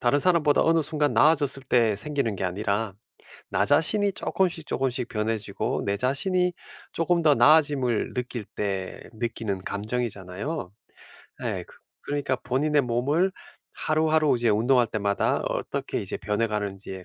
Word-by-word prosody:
다른 140 +4 +2
사람보다 165 -4 +4
어느 165 0 +3
순간 150 0 +3
나아졌을 145 -3 +5
때 115 -5 +2
생기는 120 -3 -2
게 95 - -3
아니라 100 +2 -2 0.6
나 - - +2
자신이 200 +7 +2
쪼끔씩, 175 -5 -1
쪼끔씩 130 -2 -1
변해지고 110 -1 -2
내 100 0 0
자신이 180 - 0 0.4
쪼금 170 +1 0
더 150 -2 +5
나아짐을 145 -6 +3
느낄 125 -3 -4
때 95 -2 -3 0.2
느끼는 110 -4 -4
감정이잖아요. 105 - -4 0.7
예. - - -3
그 - - -18 0.3
그러니까 145 -2 -2
본인의 145 +5 0
몸을 140 +10 0 0.4
하루하루 155 -2 +1
이제 120 0 0
운동할 120 +3 +2
때마다 100 -2 0
어떻게 - - -3
이제 - - -4
변해가는지에 105 -3 -3
125 Hz, 325 characters per minute, -25 LUFS, 105-150 Hz, 0.7 s, 나아졌을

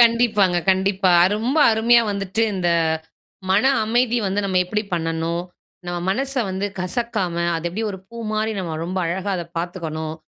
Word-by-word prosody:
கண்டிப்பாங்க. 230 -6 +4
கண்டிப்பா. 190 -1 +2 0.2
ரொம்ப 250 +8 0
அருமையா 235 +2 +4
வந்துவிட்டு 200 +2 -2
இந்த 180 -2 0 0.8
மன 195 +4 +3 0.2
அமைதி 240 +2 +1
வந்து 195 +2 0
நம்ம 185 -2 +1
எப்பிடி 210 +4 -2
பண்ணணும். 165 +1 -2 0.4
நம்ம 175 0 -3
மனச 270 +6 -1 0.2
வந்து 190 +2 -2
கசக்காம, 185 -1 -2 0.2
அது 165 - -4
எப்பிடி 215 +6 -3
ஒரு 190 - -7
பூமாரி 220 -1 -2
நம்ம 170 -3 -4
ரொம்ப 185 +2 -3
அழகா 190 +4 -2
அத 175 - -3 0.2
பாத்துக்கணும். 160 -3 -4
195 Hz, 145 wpm, -21 LUFS, 175-220 Hz, 0.8 s, கண்டிப்பாங்க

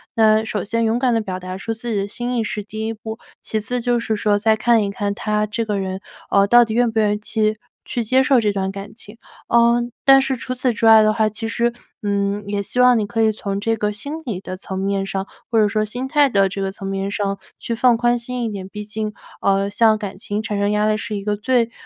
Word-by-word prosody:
那 220 -1 +4
首 210 -3 -2
先 230 +2 0
勇 225 +1 +1
敢 250 -1 +2
地 225 - +2
表 190 -4 -4
达 185 0 -6
出 225 +4 -3
自 225 +2 -6
己 215 - 0
的 195 - -2
心 240 +4 -3
意， 225 - +1
是 210 0 -3
第 215 +2 -6
1 225 - -2
步。 220 0 -7 0.2
其 220 - -2
次 245 +4 -2
就 240 0 +1
是 220 -1 -1
说 205 -1 +2
再 220 +1 +3
看 225 0 +3
一 200 - -2
看 200 0 -2
他 210 -2 0
这 215 +2 -2
个 210 -2 -1
人， 190 0 -4 0.3
哦， 200 0 +4
到 240 +4 +6
底 220 - -4
愿 240 0 +2
不 220 - 0
愿 210 -1 +3
意 - - -1
期 215 0 0 0.3
去 240 - -2
接 260 +4 +3
受 265 -1 +4
这 210 -2 +1
段 195 -1 -2
感 200 +1 -8
情。 220 -1 -10 0.3
嗯， 235 +1 +3
但 270 0 +8
是 270 0 -1
除 255 +1 -4
此 250 -1 0
之 225 - -1
外 220 -1 +8
的 215 0 +3
话， 220 -1 +2
其 215 +2 -5
实， 235 +1 +1 0.3
嗯， 200 0 -1
也 205 0 -1
希 225 +5 -3
望 250 -1 +6
你 210 - 0
可 225 +1 -1
以 220 - +4
从 200 -1 -4
这 225 +2 0
个 210 -1 -1
心 245 +8 -6
理 215 -8 -3
的 185 - -6
层 190 0 -6
面 195 0 -1
上， 195 0 -3 0.2
或 230 - +1
者 210 - +4
说 215 +1 0
心 245 +5 -4
态 290 0 +4
的 195 -4 +3
这 195 - -5
个 195 0 -1
层 195 0 -8
面 195 0 -2
上 200 -1 -2 0.2
去 235 - -4
放 240 +1 +4
宽 240 +1 +2
心 245 +1 -4
一 225 - -1
点， 195 -3 -6
毕 210 +1 -7
竟， 215 0 -4 0.3
呃， 195 0 +2
像 215 +1 +3
感 200 -3 -6
情 205 +1 -3
产 205 -2 -2
生 205 +1 +1
压 210 0 +1
力 215 - +2
是 215 -1 -4
一 200 - -4
个 210 0 0
最， 235 +1 +1
215 Hz, 285 characters per minute, -20 LUFS, 200-235 Hz, 0.3 s, 但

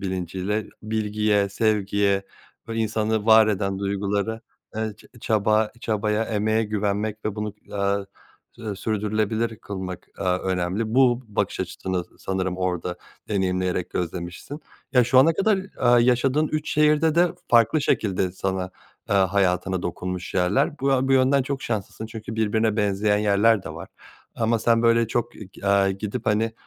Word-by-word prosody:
bilinciyle, 95 +2 -3 0.2
bilgiye 105 -2 0
sevgiye 100 -1 +1 0.5
ve 115 - -4
insanı 110 -1 0
var 110 -1 +7
eden 100 -2 -1
duygulara, 100 +2 -2 0.4
eee, 110 -1 -2
ç - - -19 0.2
çaba, 110 0 +2
çabaya, 110 0 0
emeğe 110 +1 0
güvenmek 105 0 -2
ve 110 - -2
bunu, 105 -1 -4
eee, 100 0 -1 0.5
sü 110 -4 -6
sürdürülebilir 110 +2 -1
kılmak, 95 -3 -7
eee, 100 - -4
önemli. 90 +4 -1
Bu 125 -2 +4
bakış 105 - -2
açısını 95 -2 -3
sanırım 95 -1 -2
orada 90 -1 -2 0.3
deneyimleyerek 90 -3 -1
gözlemişsin. 90 - -5 0.3
Ya 125 -3 +5
şu 130 +2 +4
ana 150 +6 +6
kadar, 200 +5 +2
eee, 120 -11 +2
yaşadığın 135 +5 +2
3 155 0 -3
şehirde 150 +1 +3
de 175 +1 +4 0.2
farklı 120 +6 +4
şekilde 95 -8 0
sana, 95 0 -3 0.4
eee, - - +1
hayatına 95 -1 +1
dokunmuş 90 +1 -4
yerler. 95 - +1
Bu 135 -1 +2
bu 135 - +3
yönden 135 +1 +4
çok 135 0 -4
şanslısın 110 0 -4
çünkü 110 0 -7
birbirine 110 0 +1
benzeyen 105 0 +1
yerler 105 0 +3
de - - -7
var - - -8 0.5
ama 115 0 +1
sen 115 +1 +2
böyle 115 0 +4
çok 120 +1 -1
k 100 -1 -7
aaa, 100 -1 +4
gidip 100 +2 -5
hani 110 +2 +1
105 Hz, 145 wpm, -24 LUFS, 95-115 Hz, 0.5 s, var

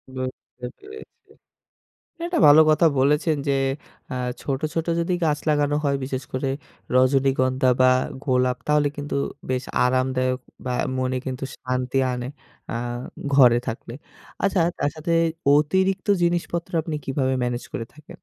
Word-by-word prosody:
বুঝতে 130 -1 -7
পেরেছি, 420 +1 -13 1.0
এটা 350 +1 -1
ভালো 145 +2 +9
কথা 155 +2 +4
বলেছেন, 150 +3 +2
যে 140 - +3 0.6
আ 130 - -3 0.3
ছোট, 135 -1 -2
ছোট 165 0 -2
যদি 170 +2 0
গাছ 150 -2 +1
লাগানো 145 -1 +2
হয় 140 -1 +1
বিশেষ 130 -1 -3
করে 130 +1 -1 0.5
রজনীগন্ধা 130 0 +3
বা 130 - +6 0.4
গোলাপ 125 -2 +1
তাহলে 150 -1 +3
কিন্তু 145 0 -4 0.3
বেশ 130 0 -1 0.2
আরামদায়ক 130 0 +1 0.3
বা 125 - -1 0.3
মনে 130 0 0
কিন্তু 130 0 -4
শান্তি 130 +1 -2
আনে 125 0 -4 0.4
আ - - -3 0.6
ঘরে 125 -4 +7
থাকলে। 115 +1 -5 0.5
আচ্ছা 195 -2 +2 0.2
তার - - +1
সাথে 160 +2 -3 0.4
অতিরিক্ত 190 +6 +1 0.2
জিনিসপত্র 170 0 -1
আপনি 155 -1 -4
কিভাবে 130 -1 0
মেনেজ 120 0 -2
করে 115 - -3
থাকেন? 150 +1 -14
135 Hz, 135 wpm, -23 LUFS, 130-155 Hz, 1.0 s, ভালো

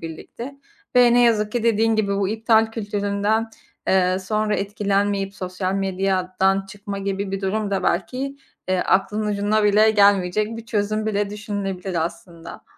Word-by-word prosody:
birlikte 165 - -8 0.4
ve 245 -1 +6
ne 245 - +5
yazık 215 -3 +2
ki 240 -2 -1
dediğin 225 -1 +2
gibi 200 -2 0
bu 195 -1 0
iptal 220 +1 +2
kültüründen, 205 +1 -1 0.4
eee, 185 0 +3
sonra 215 +2 -1
etkilenmeyip 200 -1 -1
sosyal 185 +1 -3
medyadan 190 0 0
çıkma 200 0 -7
gibi 195 0 -3
bir 195 - -3
durum 200 +1 -1
da 195 - -1
belki, 260 +10 -1 0.3
eee, 185 - +1
aklının 210 +4 +1
ucuna 210 +1 +1
bile 210 +1 +5
gelmeyecek 205 +1 +3
bir 230 - -9
çözüm 215 0 -1
bile 205 -1 -1
düşünülebilir 195 -4 -3
aslında. 170 0 -9
200 Hz, 145 wpm, -22 LUFS, 195-215 Hz, 0.4 s, ve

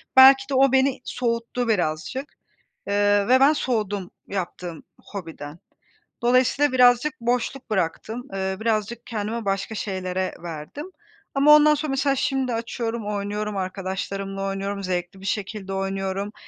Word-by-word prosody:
Belki 270 +1 +8
de - - -2
o 270 0 +5
beni 265 0 +2
soğuttu 235 0 -2
birazcık, 195 - -1 0.5
eee, 205 0 +3
ve 255 +2 +6
ben 275 +3 +6
soğudum 205 - -2 0.2
yaptığım 180 -3 -5 0.3
hobiden. 165 -5 -7 0.6
Dolayısıyla 255 +3 +3
birazcık 250 +2 +4
boşluk 245 +2 -1
bıraktım, 215 +6 -2
eee, 190 0 -1
birazcık 225 +1 -1
kendimi 225 0 -3
başka 195 +3 -2
şeylere 185 -2 -3
verdim. 170 - -7 0.5
Ama 280 +2 +4
ondan 300 0 +6
sonra 300 0 -3
mesela 275 0 +1
şimdi 265 -2 0
açıyorum, 230 -1 -3
oynuyorum, 210 0 -3
arkadaşlarımla 195 +1 -4
oynuyorum, 195 +1 -3
zevkli 180 0 -3
bir 195 - -8
şekilde 200 -1 -3
oynuyorum. 195 +1 -2
210 Hz, 130 wpm, -24 LUFS, 195-255 Hz, 0.6 s, Belki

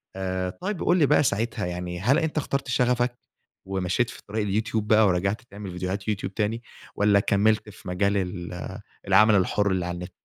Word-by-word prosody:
آآ، 95 -1 -2
طيب 190 - -4
قُل 175 - +3
لي 155 - +5
بقى 150 +1 +4
ساعتها 115 -4 -1
يعني 90 0 -4
هل 125 - +3
أنت 160 -2 -2
اخترت 140 -2 -1
شغفك، 125 0 +1 0.5
ومشيت 95 +5 0
في - - -10
طريق 105 +1 -2
اليوتيوب 105 +1 -1
بقى 110 -1 +5
ورجعت 100 +5 0
تعمل 100 -5 -9
فيديوهات 95 +3 -4
يوتيوب 100 -2 -2
تاني، 110 +2 -1 0.3
والّا 105 0 +4
كمّلت 105 +2 +2
في 95 - -13
مجال 100 +3 +1
ال 90 -2 -3 0.6
العمل 105 +3 +6
الحر 100 +1 +2
اللي 90 -2 0
على 90 0 -3
النت؟ 90 0 -7
100 Hz, 180 wpm, -25 LUFS, 95-115 Hz, 0.6 s, العمل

